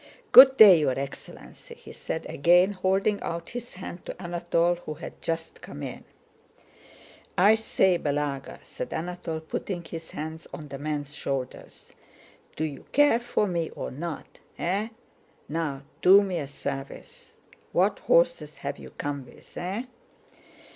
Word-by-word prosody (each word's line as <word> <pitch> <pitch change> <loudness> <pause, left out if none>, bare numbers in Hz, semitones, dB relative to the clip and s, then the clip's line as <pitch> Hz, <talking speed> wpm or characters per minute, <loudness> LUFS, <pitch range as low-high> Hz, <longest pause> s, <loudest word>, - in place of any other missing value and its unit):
"Good 265 +1 +10
day, 195 -6 +10
your 135 -4 +1
excellency!" 135 0 -8
he - - -13
said, - - -5
again 175 +6 +4
holding 195 +2 +1
out 170 0 -4
his 245 -2 -7
hand 180 -1 -8
to - - -7
Anatole 175 -1 0
who 155 -3 -7
had - - -10
just 165 0 -4
come 75 - -9
in. - - -7 1.3
"I 200 +4 +6
say, 190 -5 +2
Balagá," 145 -2 -3
said - - -6
Anatole, 170 -1 -4
putting 175 +2 -4
his 165 -1 -8
hands 160 +1 -7
on 150 -1 -8
the 135 0 -7
man's 145 -1 -4
shoulders, 135 -3 -5 0.6
"do 155 - -2
you 145 -4 -5
care 290 -4 +5
for 240 -3 0
me 170 -4 -1
or - - -5
not? 165 +4 -7 0.2
Eh? 200 +5 -1 0.6
Now, 145 -3 -3 0.2
do 195 +3 +8
me 185 -3 -2
a 140 - -4
service.... 140 - -7 0.3
What - - +2
horses - - +2
have - - -5
you - - -10
come 145 -1 -3
with? - - -18
Eh?" 190 +7 -3
170 Hz, 145 wpm, -26 LUFS, 150-195 Hz, 1.3 s, Good